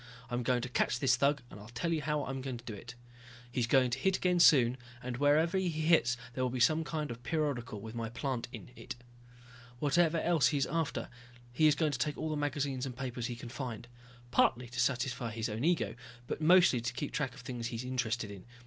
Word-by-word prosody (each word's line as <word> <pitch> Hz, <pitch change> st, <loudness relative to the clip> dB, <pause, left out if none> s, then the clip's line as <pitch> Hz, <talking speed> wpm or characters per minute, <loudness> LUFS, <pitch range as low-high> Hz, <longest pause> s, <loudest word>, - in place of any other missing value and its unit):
I'm 120 Hz, 0 st, 0 dB
going 120 Hz, 0 st, +1 dB
to -, -, -2 dB
catch 125 Hz, -, +1 dB
this 125 Hz, 0 st, +3 dB
thug 140 Hz, +1 st, +1 dB
and -, -, -10 dB
I'll 105 Hz, +2 st, -11 dB
tell 145 Hz, +8 st, -2 dB
you 160 Hz, -, 0 dB
how 150 Hz, 0 st, -1 dB
I'll 135 Hz, -, -4 dB
do 120 Hz, -3 st, -5 dB
it. 115 Hz, +4 st, -9 dB, 0.6 s
He's 120 Hz, -2 st, 0 dB
going 125 Hz, 0 st, +4 dB
to 130 Hz, -, -1 dB
hit 190 Hz, +5 st, +2 dB
again 180 Hz, -1 st, +2 dB
soon, 130 Hz, -7 st, +6 dB, 0.3 s
and 125 Hz, -1 st, -4 dB
wherever 155 Hz, +6 st, +3 dB
he 185 Hz, -2 st, 0 dB
hits 155 Hz, -6 st, +3 dB, 0.2 s
there 130 Hz, -, -1 dB
will 125 Hz, -, +1 dB
be 125 Hz, +1 st, -3 dB
some 155 Hz, +6 st, +4 dB
kind 150 Hz, -3 st, -3 dB
of 115 Hz, -, -5 dB
a -, -, -23 dB
periodical 130 Hz, -6 st, -2 dB
with 110 Hz, +2 st, -8 dB
my 115 Hz, -1 st, -3 dB
plant 130 Hz, 0 st, -3 dB
in -, -, -9 dB
it. -, -, -7 dB, 0.8 s
Whatever 160 Hz, +4 st, +2 dB
else 165 Hz, -9 st, +3 dB
he 145 Hz, -, +1 dB
is 135 Hz, -, +2 dB
after, 165 Hz, 0 st, -2 dB, 0.5 s
he 155 Hz, +5 st, +4 dB
is 150 Hz, -, +5 dB
going 155 Hz, -2 st, +1 dB
to 130 Hz, -, -3 dB
take 145 Hz, +4 st, -1 dB
all -, -, -3 dB
of -, -, -2 dB
the 155 Hz, -, -1 dB
magazines 140 Hz, -2 st, -1 dB
and 125 Hz, -2 st, -7 dB
papers 125 Hz, -3 st, -3 dB
he 120 Hz, -, -4 dB
can 120 Hz, 0 st, -8 dB
find. 120 Hz, -2 st, -6 dB, 0.4 s
Partly 125 Hz, 0 st, +3 dB
to 125 Hz, 0 st, -6 dB
satisfy 125 Hz, -1 st, 0 dB
his 110 Hz, +1 st, -3 dB
own 110 Hz, +3 st, -3 dB
ego, 170 Hz, +1 st, +2 dB, 0.3 s
but 155 Hz, -, -4 dB
mostly 170 Hz, -6 st, +6 dB
to 120 Hz, -, -3 dB
keep 135 Hz, +3 st, -4 dB
track 135 Hz, -4 st, -2 dB
of 135 Hz, -, -11 dB
the -, -, -20 dB
things 120 Hz, -2 st, -4 dB
he 120 Hz, -, -5 dB
is 115 Hz, -, -4 dB
interested 120 Hz, -4 st, -2 dB
in. 100 Hz, -2 st, -10 dB
130 Hz, 240 wpm, -32 LUFS, 120-150 Hz, 0.8 s, soon